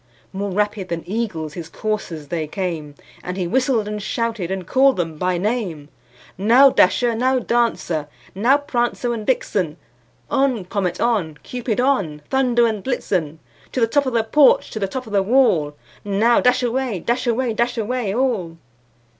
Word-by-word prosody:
More 200 Hz, +1 st, -3 dB
rapid 205 Hz, -1 st, -1 dB
than 170 Hz, -1 st, -3 dB
eagles 180 Hz, -7 st, -3 dB
his 165 Hz, -1 st, -7 dB
coursers 180 Hz, -9 st, -4 dB
they 160 Hz, -3 st, -2 dB
came, 160 Hz, -4 st, -4 dB, 0.3 s
And 180 Hz, +1 st, -5 dB
he 185 Hz, -, -1 dB
whistled, 245 Hz, +1 st, +1 dB
and 210 Hz, 0 st, -4 dB
shouted, 225 Hz, -4 st, -2 dB
and 190 Hz, -1 st, -3 dB
called 265 Hz, +7 st, +3 dB
them 165 Hz, -3 st, -3 dB
by 180 Hz, -1 st, 0 dB
name; 185 Hz, -8 st, -2 dB, 0.5 s
"Now, 245 Hz, +7 st, +6 dB
Dasher! 245 Hz, -2 st, +3 dB
now, 255 Hz, +3 st, +1 dB
Dancer! 230 Hz, -11 st, 0 dB, 0.3 s
now, 240 Hz, +9 st, +3 dB
Prancer 240 Hz, -3 st, -1 dB
and 220 Hz, -2 st, -6 dB
Vixen! 185 Hz, -, 0 dB, 0.5 s
On! 270 Hz, -8 st, +1 dB
Comet, 180 Hz, -2 st, -2 dB
on! 200 Hz, -11 st, 0 dB
Cupid, 245 Hz, -3 st, -3 dB
on! 200 Hz, -, 0 dB
Dunder 250 Hz, -3 st, +3 dB
and 215 Hz, -4 st, -1 dB
Blitzen 180 Hz, -, -2 dB, 0.4 s
To -, -, -1 dB
the 230 Hz, -, +4 dB
top 280 Hz, +4 st, +1 dB
of 255 Hz, -, -2 dB
the 230 Hz, -1 st, +2 dB
porch, 275 Hz, +5 st, +4 dB
to 220 Hz, -, -4 dB
the 195 Hz, -, -1 dB
top 255 Hz, +6 st, -5 dB
of 215 Hz, -, -10 dB
the 200 Hz, -, +4 dB
wall! 190 Hz, -, +2 dB, 0.3 s
Now, 205 Hz, +4 st, +3 dB
dash 250 Hz, 0 st, +3 dB
away, 245 Hz, -3 st, -1 dB
dash 240 Hz, +8 st, -1 dB
away, 240 Hz, 0 st, +1 dB
dash 240 Hz, +2 st, -1 dB
away 230 Hz, -1 st, -1 dB
all!" 210 Hz, -8 st, -1 dB
215 Hz, 170 wpm, -21 LUFS, 180-245 Hz, 0.5 s, Now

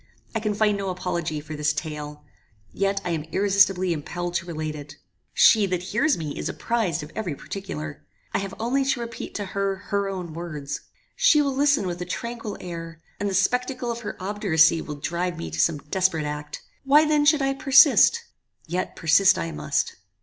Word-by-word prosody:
I 225 Hz, -, 0 dB
can 215 Hz, -1 st, -1 dB
find 210 Hz, -1 st, +2 dB
no 195 Hz, -1 st, -2 dB
apology 175 Hz, -4 st, -3 dB
for 150 Hz, +1 st, -8 dB
this 150 Hz, 0 st, +1 dB
tale. 150 Hz, -2 st, -6 dB, 0.5 s
Yet 195 Hz, 0 st, 0 dB
I 175 Hz, -, -1 dB
am 160 Hz, -2 st, -1 dB
irresistibly 195 Hz, 0 st, +3 dB
impelled 175 Hz, +3 st, -4 dB
to 175 Hz, -, -2 dB
relate 155 Hz, -2 st, -4 dB
it. 145 Hz, -1 st, -9 dB, 0.4 s
She 215 Hz, -3 st, +5 dB
that 180 Hz, -1 st, -2 dB
hears 260 Hz, +11 st, +1 dB
me 155 Hz, -3 st, -5 dB
is -, -, -2 dB
apprized 215 Hz, -11 st, -1 dB
of 150 Hz, -, -10 dB
every 185 Hz, -9 st, -3 dB
particular. 155 Hz, -5 st, -7 dB, 0.3 s
I -, -, +1 dB
have 195 Hz, -1 st, -5 dB
only 250 Hz, +5 st, +1 dB
to 265 Hz, -2 st, 0 dB
repeat 235 Hz, -1 st, -6 dB
to 205 Hz, -, -3 dB
her 195 Hz, 0 st, 0 dB
her 200 Hz, +1 st, -2 dB
own 180 Hz, -4 st, -5 dB
words. 150 Hz, -4 st, -5 dB, 0.3 s
She -, -, +5 dB
will 280 Hz, -2 st, +1 dB
listen 285 Hz, -4 st, +2 dB
with 175 Hz, -1 st, -4 dB
a -, -, -3 dB
tranquil 230 Hz, +3 st, -5 dB
air, 165 Hz, -2 st, -7 dB, 0.2 s
and 205 Hz, -, -1 dB
the 190 Hz, -, -2 dB
spectacle 250 Hz, +5 st, 0 dB
of 235 Hz, -, -4 dB
her 210 Hz, -, -6 dB
obduracy 175 Hz, -5 st, +3 dB
will 150 Hz, -, -6 dB
drive 170 Hz, +4 st, -3 dB
me 165 Hz, -, -6 dB
to -, -, -5 dB
some 165 Hz, -3 st, +3 dB
desperate 160 Hz, +2 st, 0 dB
act. 150 Hz, 0 st, -6 dB, 0.2 s
Why 290 Hz, +3 st, +5 dB
then 300 Hz, -1 st, +3 dB
should 295 Hz, -1 st, +4 dB
I 270 Hz, 0 st, +1 dB
persist! 280 Hz, -, +6 dB, 0.4 s
yet 180 Hz, +3 st, -3 dB
persist 185 Hz, +4 st, +4 dB
I 165 Hz, -, -3 dB
must." 150 Hz, -2 st, -2 dB
185 Hz, 190 wpm, -24 LUFS, 160-220 Hz, 0.5 s, persist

